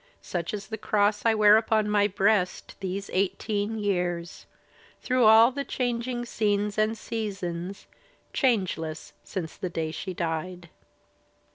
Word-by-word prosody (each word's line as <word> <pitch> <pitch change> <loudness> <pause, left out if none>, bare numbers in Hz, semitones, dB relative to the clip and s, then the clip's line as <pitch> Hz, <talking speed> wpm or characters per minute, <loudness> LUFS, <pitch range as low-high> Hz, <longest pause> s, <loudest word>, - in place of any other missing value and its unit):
Such 170 -2 -3
is 200 -1 -6
the 220 -1 -5
cross 210 0 +1
I 225 - +4
wear 210 0 +7
upon 220 -1 +1
my 205 -1 +3
breast 200 -1 0
These 195 +1 -4
eighteen 205 +3 -1
years, 175 -4 -2 0.5
through 255 -2 +2
all 225 +3 +8
the 280 +2 -3
changing 245 -1 -2
scries 210 -3 0
And 215 +1 +1
seasons, 195 -5 -5 0.5
changless 185 - -1
since 170 -5 -5
the 185 - -4
day 160 -2 -3
she 185 +3 -6
died. 170 +1 -4
205 Hz, 130 wpm, -27 LUFS, 180-220 Hz, 0.5 s, all